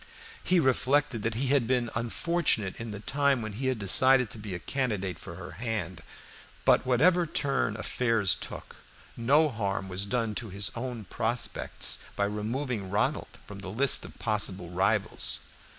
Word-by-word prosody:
He 180 -1 +3
reflected 135 -2 +1
that 110 +1 -2
he 130 +3 -1
had 135 -4 +2
been 125 -2 0
unfortunate 115 - -1
in 115 - -5
the 100 -1 -7
time 140 0 +1
when 110 - -5
he 130 +6 -3
had 130 -2 0
decided 125 +4 +5
to 110 - -7
be 105 -3 -6
a - - -2
candidate 105 - -2
for - - -9
her - - -9
hand; 100 -8 -3 0.6
but - - +4
whatever 170 +8 +3
turn 135 -8 0
affairs 115 -3 +1
took, - - -8 0.4
no 145 +7 +3
harm 100 -5 -3
was 95 +2 -2
done 115 0 -1
to 110 +1 -5
his 100 +1 -1
own 120 -3 -5
prospects 115 +7 -2 0.2
by 100 - +1
removing 105 +1 -3
Ronald 105 +2 -1
from 100 -1 -10
the 95 -1 -7
list 130 +7 +5
of - - -11
possible 100 -5 +1
rivals. 95 +2 +1
115 Hz, 165 wpm, -28 LUFS, 100-130 Hz, 0.6 s, decided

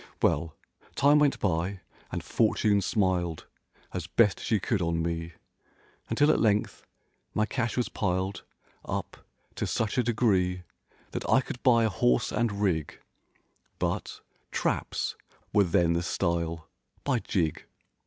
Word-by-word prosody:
Well, 80 +2 +1 0.4
time 145 +2 +5
went 145 -2 +3
by 95 +1 -1 0.3
and - - -3
Fortune 100 -2 +2
smiled 90 -4 0 0.5
As - - -4
best 105 -6 +3
she 110 - +1
could 100 0 0
on 85 -1 0
me. 85 0 -3 0.8
Until 145 +1 +4
at - - +2
length 105 -2 +1 0.5
my 110 - +3
cash 120 +1 -2
was 125 - +1
piled 95 0 -2 0.4
Up - - -4 0.4
to - - -3
such 110 +2 0
a - - +3
degree 95 -6 +1 0.5
That - - -4
I - - +6
could 125 -1 -6
buy 115 -3 +5
a 110 - +3
horse 60 -9 +2
and 105 -2 0
rig— 80 -7 0 0.8
But—"Traps" - - -3 0.4
were 100 -2 +5
then 85 -1 +3
the 85 - 0
style, 85 -3 -1 0.4
"By 130 -4 +1
jig!" 85 -8 -1
95 Hz, 135 wpm, -28 LUFS, 85-115 Hz, 0.8 s, I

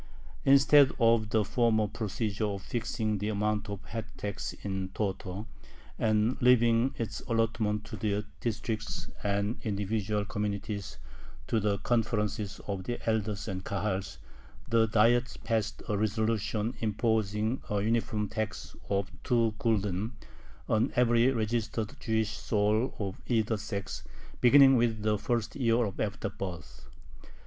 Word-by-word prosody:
Instead 140 0 +7
of 115 -2 +4
the 110 -1 +2
former 110 -1 +2
procedure 105 0 -2
of 100 -2 -4
fixing 110 -3 -2
the 105 +2 -1
amount 105 0 -1
of 100 -2 -4
the - - -16
head 115 -1 -4
tax 100 -1 -4
in 95 -2 -3
toto, 100 0 -3 0.5
and 110 +2 +2
leaving 120 +1 +4
its 115 - -3
allotment 115 -2 0
to - - -7
the 105 0 -1
Districts 110 -2 -3
and 100 +3 0
individual 105 -1 -1
communities 100 -6 -3 0.5
to 115 - +1
the 105 -1 +1
conferences 105 -3 -1
of 95 -2 -4
the 120 - -3
elders 110 -2 0
and 95 -2 -4
Kahals, 95 -3 -2 0.5
the 115 0 +3
Diet 115 +3 +3
passed 110 -2 -1
a 105 - 0
resolution 110 +1 0
imposing 110 +1 0
a 105 - +1
uniform 110 0 0
tax 110 0 -4
of 100 -2 0
two 115 -3 +2
gulden 105 -1 0 0.5
on 110 +1 +2
every 120 0 +4
registered 110 -2 -1
Jewish 110 -1 0
soul 105 +5 +1
of 100 -2 -4
either 110 -2 +2
sex, 100 -2 -5 0.4
beginning 135 +1 +7
with 115 -3 +1
the 105 -1 +1
first 115 -1 -1
year 115 -5 +2
after 100 0 -2
birth. 80 -11 -7
110 Hz, 130 wpm, -30 LUFS, 100-115 Hz, 0.5 s, Instead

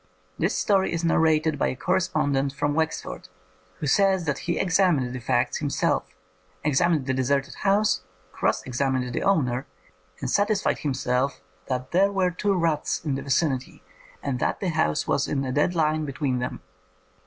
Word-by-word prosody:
This 175 +5 +1
story 195 -2 +2
is 165 0 -2
narrated 160 -2 +2
by - - +2
a - - -2
correspondent 145 -5 0
from 145 +1 -1
Wexford, 160 -11 -3 0.5
who - - -4
says 190 +3 +3
that 150 -3 -1
he 170 - +1
examined 180 -9 +2
the 125 - -4
facts 120 0 0
himself, 145 -3 -1 0.5
examined 150 0 +2
the 130 - 0
deserted 135 +2 0
house, 200 - +2 0.3
cross - - 0
examined 130 -1 -1
the - - -1
owner, 135 -9 +1 0.5
and 130 - -3
satisfied 205 - +1
himself 130 -1 -1 0.3
that 130 0 -3
there 195 +3 +4
were 190 -2 +1
two 200 +3 0
raths 165 -3 0
in 145 - 0
the 135 - -2
vicinity, 135 -1 -1 0.4
and 135 -3 -2
that - - 0
the 190 - -1
house 75 - 0
was - - +1
in 140 -2 -1
a 130 - -2
dead 150 +6 +1
line 155 -1 +1
between 135 -2 -2
them. 125 - -4
150 Hz, 165 wpm, -25 LUFS, 130-175 Hz, 0.5 s, there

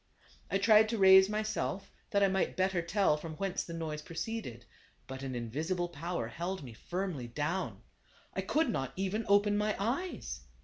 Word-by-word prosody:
I 195 - +2
tried 215 +2 +6
to 230 - -1
raise 190 0 +8
myself, 210 -2 -2 0.2
that 200 0 +2
I - - +6
might 190 -1 0
better 185 -1 +2
tell 170 -2 +2
from 155 +1 -7
whence 195 +1 -2
the 170 - -7
noise 155 -2 -4
proceeded. 165 - -5 0.4
But 130 0 -7
an 135 -2 -4
invisible 160 +10 -2
power 170 -5 -3
held 175 +8 -4
me 120 -4 -9
firmly 175 - -4
down. 150 +9 -3 0.5
I - - -1
could 310 -5 +1
not 135 - -2
even 195 +4 -1
open 205 +1 +4
my 210 0 +1
eyes. 235 - -3
185 Hz, 170 wpm, -32 LUFS, 150-205 Hz, 0.5 s, raise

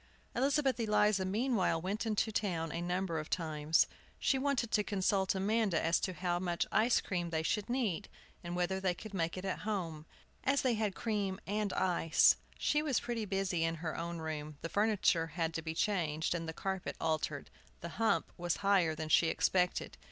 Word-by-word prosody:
Elizabeth 270 0 +2
Eliza 210 -3 +3
meanwhile 210 -3 +1
went 200 +6 -2
into 220 +1 +1
town 170 -7 -1
a 170 - -3
number 175 -1 -1
of 155 - -6
times. 155 -2 +2 0.3
She 265 - +1
wanted 260 -4 0
to 210 - +3
consult 195 -1 +1
Amanda 200 -2 +1
as 165 +1 +2
to 185 - -2
how 175 0 -1
much 175 -1 -1
ice 230 +3 +4
cream 175 -3 -2
they 160 -1 -1
should 210 +6 -1
need, 220 -7 -1 0.3
and 175 0 -4
whether 180 +2 0
they 185 -2 0
could 215 +3 -10
make 170 -2 -1
it 185 - -5
at 190 - -2
home, 170 -7 -3 0.4
as 275 +1 +2
they 255 -2 +3
had 215 -3 -1
cream 205 -4 -1
and 205 0 -1
ice. 175 -3 +4 0.2
She 295 - +2
was 290 -5 +1
pretty 235 -2 -3
busy 195 -4 0
in 165 0 0
her 160 -1 -4
own 170 +1 -4
room; 155 -2 -5
the 165 - -3
furniture 200 -5 +2
had 165 +1 -2
to 165 - -2
be 160 0 -5
changed, 160 -6 0
and 165 -1 -3
the - - -1
carpet 190 +2 -3
altered. 155 -2 -2 0.3
The 170 - -5
"hump" 225 +6 +1
was 175 -1 -1
higher 185 -5 +4
than 155 0 -5
she 165 - +5
expected. 180 +2 +1
185 Hz, 190 wpm, -33 LUFS, 165-210 Hz, 0.4 s, she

